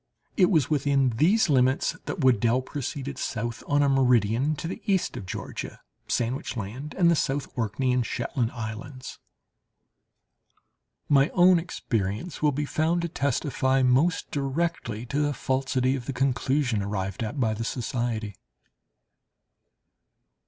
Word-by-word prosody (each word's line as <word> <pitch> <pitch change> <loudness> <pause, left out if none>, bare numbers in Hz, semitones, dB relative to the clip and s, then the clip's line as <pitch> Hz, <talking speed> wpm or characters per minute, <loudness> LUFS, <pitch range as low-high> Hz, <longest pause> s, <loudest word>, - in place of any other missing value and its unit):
It 185 -4 +4
was 155 -8 +3
within 140 -3 +2
these 185 - +3
limits 130 -2 +2
that - - -4
Weddel 125 -1 +3
proceeded 140 -1 -5
south 120 0 -3
on 145 0 +3
a - - +3
meridian 125 +1 +3
to 155 - -5
the 180 - -6
east 190 -2 +1
of 95 - -7
Georgia, - - -6 0.3
Sandwich 125 +2 -2
Land, 120 +9 -6
and 170 -3 +5
the - - +4
South 140 -1 -1
Orkney 125 +3 0
and 125 -1 +2
Shetland 120 0 -2
islands." 120 +3 -7 1.9
My 140 +1 +4
own 180 -1 +6
experience 115 - -3
will 150 -1 +4
be 145 +2 -2
found 165 +4 0
to 170 - -2
testify 135 -2 0
most 135 +7 +2
directly 135 -5 -2
to 140 +4 -2
the 145 -1 0
falsity 130 0 0
of 125 -3 -6
the 135 - -2
conclusion 130 -2 +1
arrived 100 -1 -3
at 115 +6 -3
by 110 -4 +2
the 110 +2 -4
society. 115 -3 -2
130 Hz, 140 wpm, -26 LUFS, 120-145 Hz, 1.9 s, own